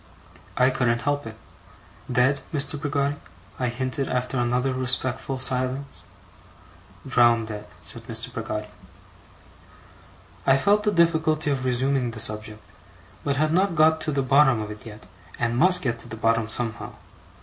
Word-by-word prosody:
I 130 +1 +4
couldn't 120 -3 0
help 145 -3 -1
it. 110 -1 -9 0.4
' - - -16
Dead, 135 +2 +3
Mr. 145 -1 -1
Peggotty?' 140 -1 -1 0.4
I 125 - 0
hinted, 130 +2 -3
after 125 0 -1
another 125 +2 0
respectful 130 +1 -1
silence. 130 -4 +1 1.0
'Drowndead,' 115 -4 +2 0.2
said - - -4
Mr. - - -4
Peggotty. 105 0 -5 1.8
I 135 - +5
felt 205 +9 +3
the 210 0 +1
difficulty 160 -4 +2
of 135 -2 -2
resuming 130 0 0
the 115 -1 -8
subject, 110 0 -1 0.6
but 140 - 0
had 155 +2 +1
not 185 0 +2
got 160 +1 +4
to 155 - -2
the 140 -1 0
bottom 135 -2 +4
of 105 - -7
it 105 +2 -10
yet, 105 -3 -11 0.3
and 115 -1 -1
must 180 +7 +6
get 115 -3 -1
to 120 - -8
the 110 - -7
bottom 115 0 +1
somehow. 110 -1 -4
130 Hz, 150 wpm, -24 LUFS, 115-145 Hz, 1.8 s, must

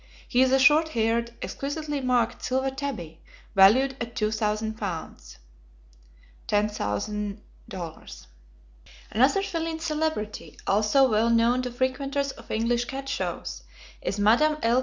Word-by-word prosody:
He 245 - +2
is 260 0 +4
a 265 - +5
short 300 +4 +5
haired, 235 -2 0
exquisitely 290 0 -4
marked 250 -3 +1
silver 265 +1 0
tabby 235 - -5 0.3
valued 230 +8 +5
at 235 0 -5
two 215 0 0
thousand 220 0 -1
pounds 160 - -6 1.1
($10,000). 205 - -1 1.7
Another 265 - +3
feline 330 -4 -3
celebrity 310 -9 -3
also 215 +7 +4
well 225 0 +2
known 235 +2 +3
to 250 - -3
frequenters 275 +3 -1
of 230 - -15
English 235 +2 0
cat 270 +2 -6
shows, - - -4 0.4
is 200 - -2
Madame 240 +10 +4
L. 235 +2 +4
240 Hz, 120 wpm, -26 LUFS, 215-275 Hz, 1.7 s, a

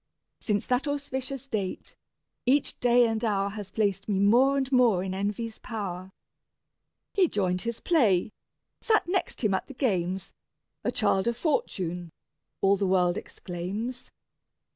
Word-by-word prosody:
Since 205 -2 -1
that 250 +4 0
auspicious 275 -2 -3
date, 200 -7 -4 0.5
each 275 +2 +2
day 245 0 +5
and 225 0 -1
hour 200 -3 +1
Has 205 -2 -7
placed 205 -1 -1
me 200 - +1
more 245 +8 +4
and 270 -1 -1
more 235 -8 +4
in 190 -1 -3
envy's 210 +3 -3
power: 190 -5 -5 1.0
"He 380 -3 +4
joined 185 - 0
his 235 0 -3
play, 220 - +3 0.5
sat 435 -5 +2
next 370 -7 -1
him 210 -3 +3
at 190 - -1
the 275 - -10
games: 190 - -1 0.5
A - - 0
child 205 -3 +2
of 235 0 0
Fortune!" 180 - -1 0.5
all 195 +1 +4
the 195 0 0
world 180 -1 +3
exclaims. 205 +8 -5
215 Hz, 140 wpm, -27 LUFS, 190-255 Hz, 1.0 s, day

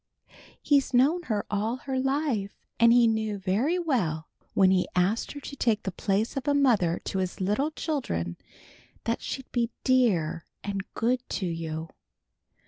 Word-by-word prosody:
He's 280 -3 +3
known 290 +8 +4
her 210 -2 0
all 215 +3 0
her 260 0 -3
life, 265 -7 0 0.2
and 230 0 +7
he 240 0 +6
knew 220 -2 0
very 205 - +1
well 195 - -1 0.3
when 190 -1 +5
he 185 -1 +2
asked 185 +6 +1
her 290 - -7
to 280 - -7
take 225 -5 +1
the 190 - -2
place 200 +4 -1
of 270 +1 -4
a 285 - +3
mother 220 -12 +3
to 190 - -2
his 185 -1 -3
little 210 +10 +1
children 250 - -3 0.7
that 230 - -1
she'd 265 -1 -6
be 235 -2 +1
dear 195 -12 +2 0.2
and 200 -1 -4
good 245 +2 +1
to 190 - -2
you. 165 -2 -4
220 Hz, 160 wpm, -27 LUFS, 190-260 Hz, 0.7 s, and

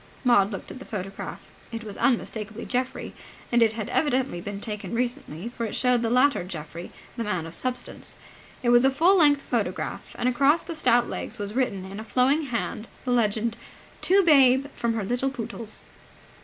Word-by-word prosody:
Maud 230 -5 +4
looked 195 - -6
at - - -9
the - - -8
photograph. 195 -4 -7 0.2
It 230 0 -5
was 210 -2 -7
unmistakably 220 -3 -1
Geoffrey. 255 0 -2 0.4
And 240 0 +4
it 225 -1 +4
had 220 -2 -4
evidently 260 - 0
been 200 +1 -5
taken 210 +1 -5
recently, 235 - -3
for 240 -1 -6
it 220 - -3
showed 250 -2 +3
the 230 - 0
later 250 -2 +3
Geoffrey, 170 -1 -7 0.3
the 230 - -1
man 185 -7 -2
of 165 - -8
substance. 250 +3 -2 0.5
It 240 - +2
was 240 +1 +6
a 270 - +6
full 330 +8 +4
length 290 -5 +5
photograph - - -3
and 245 - 0
across 275 +6 +3
the 335 - -6
stout 245 -6 +3
legs 240 - -5
was 205 -1 -5
written 220 -7 -1
in 195 +2 -7
a - - -5
flowing 265 +7 +2
hand 230 -3 -3 0.2
the 250 - 0
legend, 230 -1 +1 0.4
"To 390 +1 +5
Babe 270 -5 +6
from 235 -1 -1
her 220 - -1
little 245 +6 0
Pootles". 230 -3 -7
235 Hz, 185 wpm, -26 LUFS, 210-260 Hz, 0.5 s, was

